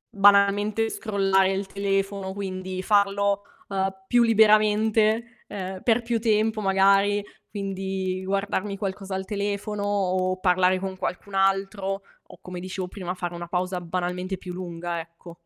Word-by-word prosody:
banalmente 205 +2 +4
scrollare 195 -3 +2
il 195 0 -2
telefono, 195 0 -1
quindi 185 -1 -4
farlo, 200 0 +2 0.3
uhm, 195 -1 -1
più 240 +2 +4
liberamente, 220 +1 +3
ehm, 190 -1 -6
per 235 0 +3
più 230 0 0
tempo 220 -1 +2
magari, 195 +1 +4 0.3
quindi 190 -2 -3
guardarmi 200 +1 -1
qualcosa 195 -1 -4
al 190 0 -3
telefono 205 0 -3
o 185 -2 0
parlare 185 0 +3
con 190 0 -4
qualcun 185 +2 -5
altro, 195 0 +1 0.3
o - - -15
come 180 -1 -7
dicevo 185 0 -4
prima, 180 -1 -5
fare 175 -1 -4
una 170 0 -6
pausa 180 +1 -2
banalmente 180 +2 -3
più 180 0 -8
lunga, 175 -1 -4
ecco. 170 +1 -13
195 Hz, 135 wpm, -25 LUFS, 185-205 Hz, 0.3 s, banalmente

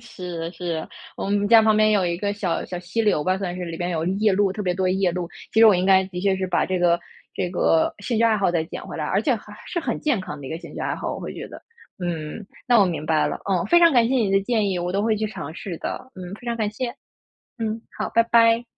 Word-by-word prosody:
是， 180 -7 -6
是， 165 -2 -4 0.3
我 - - -4
们 205 0 +1
家 225 0 +8
旁 215 -1 +4
边 215 0 +4
有 205 -3 +3
一 170 0 -1
个 200 +3 -1
小 190 -5 -2
小 180 - -5
溪 180 +5 -3
流 205 -9 +2
吧， 185 +1 +1
算 180 -2 -3
是 180 - -4
里 165 -1 -6
边 175 +1 -2
有 160 -2 -1
夜 200 +4 +2
鹭 195 -1 +2
特 210 - -4
别 180 -2 0
多 185 0 0
夜 190 0 +2
鹭。 180 -1 -3 0.3
其 - - +1
实 225 - +9
我 215 - +7
应 180 0 +1
该 190 -1 +5
的 185 -1 -6
确 195 0 +2
是 190 0 -2
把 185 - +1
这 185 -1 -1
个 170 -1 +3 0.4
这 180 - -1
个 165 -2 +2
兴 220 +2 -2
趣 230 - +4
爱 225 -1 +4
好 195 -3 +2
再 170 -2 +1
捡 160 - -8
回 - - -7
来， - - -2
而 - - +1
且 - - +2
还 - - -9
是 345 - -2
很 - - -2
健 285 -9 +1
康 150 -5 -7
的 135 - -8
一 - - -7
个 160 - -4
兴 170 -3 -11
趣 - - -6
爱 - - -1
好。 - - -4
我 - - -7
会 - - -6
觉 - - -6
得， - - -11 0.4
嗯， 175 +2 -4 0.2
那 240 -2 +5
我 - - +6
明 165 -4 -3
白 155 -1 +2
了。 - - -2
哦， 190 -3 0
非 345 0 +6
常 335 -2 +6
感 240 -3 +4
谢 265 - +1
你 225 -6 +2
的 195 0 +4
建 215 -1 +1
议， 185 -2 -1
我 175 +1 -2
都 200 +1 0
会 220 0 +2
去 215 +1 -1
尝 160 -7 -7
试 180 -1 -6
的。 260 - -5
嗯， 185 0 -7
非 245 - -13
常 235 -1 -1
感 215 -2 -1
谢。 240 +3 -4 0.6
嗯， 225 -1 -3 0.2
好， - - -2
拜 230 - +5
拜。 230 0 +4
195 Hz, 310 characters per minute, -23 LUFS, 175-220 Hz, 0.6 s, 实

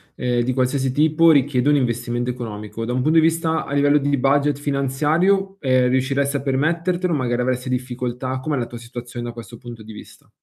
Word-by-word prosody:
ehm, 120 -1 0
di 130 +2 -1
qualsiasi 130 +1 0
tipo, 155 +3 +4
richiede 140 -2 +2
un 150 - +4
investimento 120 -1 -1
economico. 110 -2 -6
Da 120 - -3
un 130 - 0
punto 155 +5 +2
di 160 - +6
vista 165 0 0
a 140 - -6
livello 145 +1 +4
di 145 0 +1
budget 140 +2 +2
finanziario, 155 +8 0
ehm, 130 -4 +2
riusciresti 135 +2 0
a 140 - -1
permettertelo? 170 +6 0
Magari 125 -3 -1
avresti 125 0 -2
difficoltà? 125 0 -3
Com'è 150 +3 -2
la 120 -3 -2
tua 120 - -9
situazione 120 +1 -8
da 120 - -6
questo 115 0 -10
punto 120 -1 -10
di 110 +1 -11
vista? 105 - -14
130 Hz, 195 wpm, -21 LUFS, 120-145 Hz, -, di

